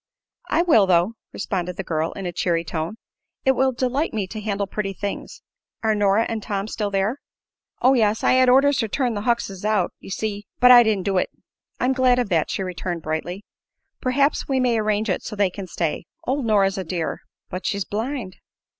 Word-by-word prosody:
"I 335 - +3
will, 225 - +5
though," 180 +4 +3 0.2
responded 180 -3 -3
the 195 - -3
girl, 160 -2 -1
in 195 - -6
a 175 - -2
cheery 170 -1 0
tone. 165 +4 -4 0.5
"It 265 - +6
will 265 0 +2
delight 255 +3 -1
me 205 -3 0
to 215 - -6
handle 200 -1 -1
pretty 195 0 -3
things. 200 +1 -6 0.4
Are 220 -1 +3
Nora 205 +1 +3
and 225 -1 -3
Tom 200 -1 -3
still 210 -1 -2
there?" 200 +7 0 0.6
"Oh, 260 +2 +6
yes. 220 -4 +2
I - - +4
had 255 0 +5
orders 275 +2 +5
to 225 - +1
turn 245 +2 0
the 205 - -3
Huckses 205 -6 -1
out, 210 -4 +1
ye - - -12
see; 205 +1 -3
but 250 0 +7
I 245 -1 +10
didn't 215 -5 +1
do 195 -2 +2
it." - - -1 0.5
"I'm 255 +2 +2
glad 255 -1 +3
of 245 -4 0
that," 165 -4 +1
she 195 - -2
returned, 175 -2 -4
brightly 175 +5 -4 0.6
"Perhaps 280 +3 +1
we 270 -1 +1
may 245 -3 +2
arrange 215 0 0
it 185 - 0
so 215 - -6
they 200 -3 +2
can 195 0 -7
stay. 165 -1 -2 0.2
Old 265 -2 -1
Nora's 195 -3 +3
a - - -2
dear." 170 -1 -3 0.3
"But 185 +1 -4
she's 200 -3 -1
blind." 225 -2 -4
210 Hz, 205 wpm, -23 LUFS, 190-245 Hz, 0.6 s, I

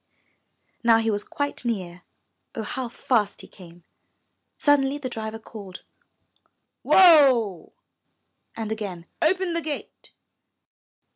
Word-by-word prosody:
Now 230 -1 +5
he 225 0 0
was 205 0 -1
quite 285 -2 -3
near, 185 -7 -4 0.5
oh, 225 - -3
how 250 +3 -4
fast 225 -3 -1
he - - -12
came! 175 -2 -16 0.7
Suddenly 285 -1 +2
the 275 -3 -5
driver 220 -1 -5
called, 205 -4 -11 1.0
''Whoa!" 270 - +5 0.8
and 220 -1 -5
again, 195 -6 -5 0.2
''Open 360 +2 +1
the 335 - -1
gate." 300 -2 -7
225 Hz, 110 wpm, -24 LUFS, 205-285 Hz, 1.0 s, Now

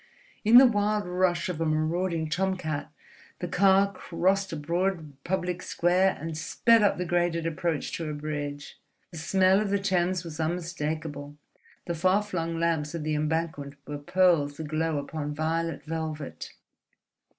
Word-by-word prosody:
In 225 +3 +7
the 265 - +10
wild 210 -2 +1
rush 180 0 +1
of 170 -3 -4
a - - +1
marauding 160 +2 0
tomcat 170 -3 -2 0.5
the - - -4
car 195 +1 +4
crossed 190 +3 0
a - - -3
broad 170 0 -2
public 180 -1 -2
square 185 +2 +2
and 160 +2 -5
sped 230 +8 +3
up 205 - +3
the 180 - -2
graded 175 -1 0
approach 165 -1 -2
to 165 -2 -4
a - - -3
bridge. 145 -1 -5 0.3
The 165 - -7
smell 190 +3 +3
of 210 - -1
the 200 - +2
Thames 185 -2 0
was 165 -2 -8
unmistakable, 155 -3 -3 0.5
the 170 - -2
far 185 +5 +2
flung 165 -5 -3
lamps 165 -2 0
of 165 - -4
the 155 0 -1
Embankment 150 -2 -2
were 145 0 -5
pearls 155 -3 +2
aglow 155 0 -1
upon 145 +1 -4
violet 165 0 -2
velvet. 155 -2 -5
165 Hz, 150 wpm, -27 LUFS, 155-185 Hz, 0.5 s, the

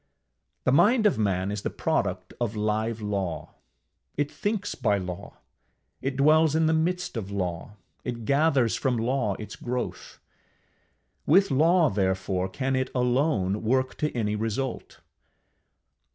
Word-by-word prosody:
The - - +2
mind 215 - +4
of 205 - +3
man 95 -2 0
is 105 -1 -3
the - - -2
product - - -2
of 115 -2 -1
live 110 +1 -1
Law; 100 -5 -3 0.6
it 145 0 0
thinks 205 -1 -2
by 110 -5 +1
law, 90 +1 -7 0.6
it 135 0 -2
dwells 155 +2 +4
in 160 0 +3
the 160 - +3
midst 175 +2 -1
of 105 -4 -4
law, 90 -1 -3 0.3
it 120 -2 -5
gathers 140 -3 +3
from 130 -4 0
law 115 -3 0
its 105 - -8
growth; 125 0 -5 1.1
with 190 +2 +5
law, 165 +5 +4
therefore, 95 -1 0
can 135 +6 -1
it 130 0 0
alone 125 - +1
work 130 +3 +1
to 150 - 0
any 105 -2 0
result. 115 +4 -4
120 Hz, 135 wpm, -26 LUFS, 105-150 Hz, 1.1 s, with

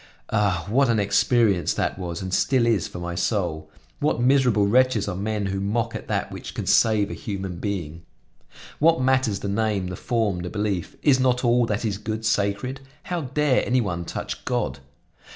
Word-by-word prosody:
Ah! 100 -6 +1
what 130 +5 +3
an 115 -2 +2
experience 100 -3 +2
that - - -1
was, 85 0 -4
and 95 -1 -5
still 130 +1 +2
is, 110 -7 +1
for - - -9
my 85 0 -4
soul! 85 -5 -1 0.3
What 150 -4 +1
miserable 125 -5 +3
wretches 120 0 +3
are - - -3
men 105 +1 -2
who 95 0 -2
mock 115 +3 -1
at - - -6
that - - -2
which - - -8
can - - -3
save 110 -2 +3
a - - -4
human 95 -3 -5
being! 85 -5 -4 0.8
What 165 +2 +4
matters 130 -5 +1
the - - -3
name, 100 -2 0
the 90 - -5
form, 110 -3 -1
the 90 0 -4
belief? 105 -4 -2
Is 135 -3 +4
not 125 -1 +2
all 120 0 +3
that 105 +1 -2
is 100 -2 -2
good 110 +1 -4
sacred? 110 +5 0 0.2
How 175 -2 -3
dare 140 0 +1
any 130 +1 +2
one 90 -7 -2
touch - - -5
God? 65 +1 -2
105 Hz, 190 wpm, -24 LUFS, 95-125 Hz, 0.8 s, What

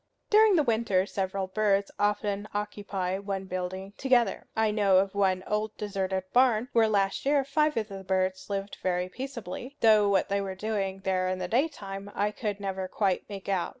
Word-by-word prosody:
During 425 -1 +6
the 310 - +4
winter 220 -6 +1
several 195 -1 -2
birds 200 0 +1
often 205 0 0
occupy 200 -3 -3
one 195 -1 -4
building 185 +1 -5
together. 245 -6 +2
I 220 -1 +2
know 200 -3 +4
of 195 +1 +2
one 190 -2 +1
old 215 0 -2
deserted 195 -2 -2
barn 245 -1 +4
where 225 -1 +5
last 195 -2 +1
year 280 0 +3
five 300 +1 +1
of 215 -1 0
the 195 -1 -7
birds 185 0 -1
lived 200 0 -3
very 180 0 0
peaceably; 255 +2 -7
though 215 -2 +6
what 195 -1 +2
they 200 0 0
were 190 -1 -4
doing 195 -2 -2
there 185 -1 0
in 185 - -1
the 185 -1 -3
daytime 200 - -2
I 205 +1 +1
could 210 -2 -4
never 190 -1 -3
quite 190 -1 -1
make 200 -2 -8
out. 190 -3 0
200 Hz, 185 wpm, -28 LUFS, 190-220 Hz, -, During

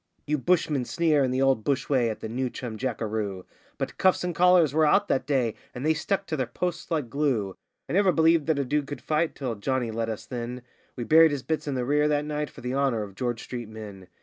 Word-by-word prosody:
You 150 0 0
bushmen 155 -4 +1
sneer 155 0 +2
in 130 - +1
the 130 +1 +1
old 135 -5 +2
bush 140 +1 0
way 125 -5 +2
at 110 - -5
the - - -4
newchum 120 0 -4
jackeroo, 110 -6 -3 0.3
But - - -4
'cuffs 185 -1 +3
'n' 180 -1 -1
collers' 175 -4 +5
were 155 0 +4
out 200 +7 +3
that 130 - 0
day, 130 -6 +1 0.2
and 125 +3 -4
they 160 - +4
stuck 195 +5 -1
to 160 - -3
their 130 -5 -1
posts 180 -2 -4
like 155 -6 -1
glue; 115 -7 -1 0.3
I - - -5
never 195 0 +4
believed 160 -2 +3
that 160 -3 +2
a 140 - 0
dude 145 +2 0
could 145 - -6
fight 155 +1 0
till 130 -4 -3
a - - -4
Johnny 125 0 -1
led 115 0 -2
us 110 0 -5
then; 120 +1 -5 0.3
We 120 - -4
buried 160 +5 +6
his 145 -3 -3
bits 155 +4 -2
in 140 - -1
the 125 -1 -1
rear 150 +3 +2
that 150 0 +1
night 150 0 -3
for - - -13
the 125 +1 -3
honour 135 -5 +1
of 100 -2 -9
George 120 +1 -3
street 120 -3 -6
men. 105 -4 -9
135 Hz, 245 wpm, -26 LUFS, 120-155 Hz, 0.3 s, buried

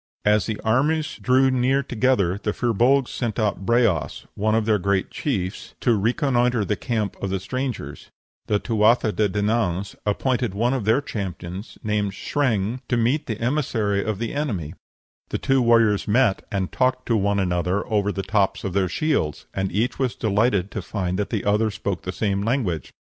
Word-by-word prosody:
As 105 0 +3
the 110 -2 -3
armies 150 +7 +1
drew 130 +1 +4
near 130 +2 +2
together 110 -7 +1
the 105 - -1
Fir 120 -2 0
Bolgs 130 +4 +3
sent 115 -5 -3
out 105 -4 -1
Breas, 115 -9 +1
one 110 +2 +1
of 110 -1 +1
their 105 -2 +2
great 95 +1 0
chiefs, 100 -9 -3
to 120 -3 +3
reconnoitre 120 - +1
the 105 - 0
camp 110 -2 -2
of 100 - -2
the 95 0 -1
strangers; 130 +5 -5 0.4
the 105 - +2
Tuatha 110 +1 +2
de 105 -1 +1
Dananns 100 -2 -1
appointed 120 +1 0
one 120 +5 +1
of 125 -6 -2
their 110 +6 +3
champions, 95 -4 -6
named 105 -2 0
Sreng, 115 -3 -1
to 120 - +2
meet 125 +6 +1
the 110 -2 -3
emissary 115 -6 0
of 110 -2 -2
the 115 +2 -3
enemy; 100 - -2 0.6
the - - -1
two 135 -1 +2
warriors 115 -4 +3
met 110 -1 +2
and 95 -2 -2
talked 130 0 +1
to 115 - +1
one 100 -1 +1
another 90 +1 0
over 105 -1 0
the 100 -1 -3
tops 95 0 0
of 95 - -3
their 95 -1 +1
shields, 140 - -1
and 95 -1 -2
each 110 +8 -1
was 130 -3 0
delighted 105 -2 +1
to 105 - -4
find 90 0 -3
that 105 - -1
the 110 -4 -2
other 105 +2 +2
spoke 100 -4 -3
the 90 - -4
same 100 +1 -1
language. 105 - -1
110 Hz, 180 wpm, -23 LUFS, 100-125 Hz, 0.6 s, drew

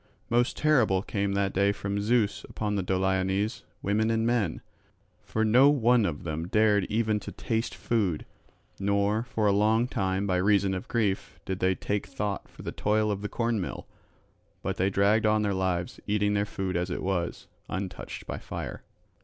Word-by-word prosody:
Most 120 +1 +2
terrible 120 -11 +3
came 100 -2 -1
that 100 -1 0
day 100 +1 +3
from 100 0 -3
Zeus 110 -1 +1
upon 105 -1 -2
the 100 - 0
Doliones, 95 +4 0 0.2
women 105 +3 +1
and 115 0 +1
men; 115 -8 0 0.6
for 110 0 -1
no 125 +6 +6
one 120 -5 +4
of 75 -3 -4
them 80 +1 -3
dared 105 -1 +3
even 110 -1 +1
to - - -8
taste 115 0 -2
food, 100 -9 0 0.5
nor 100 +2 +1
for 115 -2 -2
a 100 - +5
long 110 +4 +3
time 95 -3 -1
by 95 -2 +1
reason 100 0 +3
of 95 - -4
grief 100 -7 -1
did 95 -1 -3
they 95 0 +2
take 105 +1 -2
thought 100 +2 -3
for - - -13
the - - -4
toil 105 0 +1
of 100 -1 -3
the 105 - -3
cornmill, 115 -5 -2 0.8
but - - -2
they 95 +2 +2
dragged 100 +3 +3
on 110 0 +3
their 100 -1 +1
lives 90 -2 -1
eating 105 0 +1
their 100 0 +1
food 95 -2 -3
as 90 +1 0
it 90 - -3
was, 90 -3 -2 0.2
untouched 95 -1 -5
by - - -5
fire. - - -6
100 Hz, 180 wpm, -28 LUFS, 95-110 Hz, 0.8 s, no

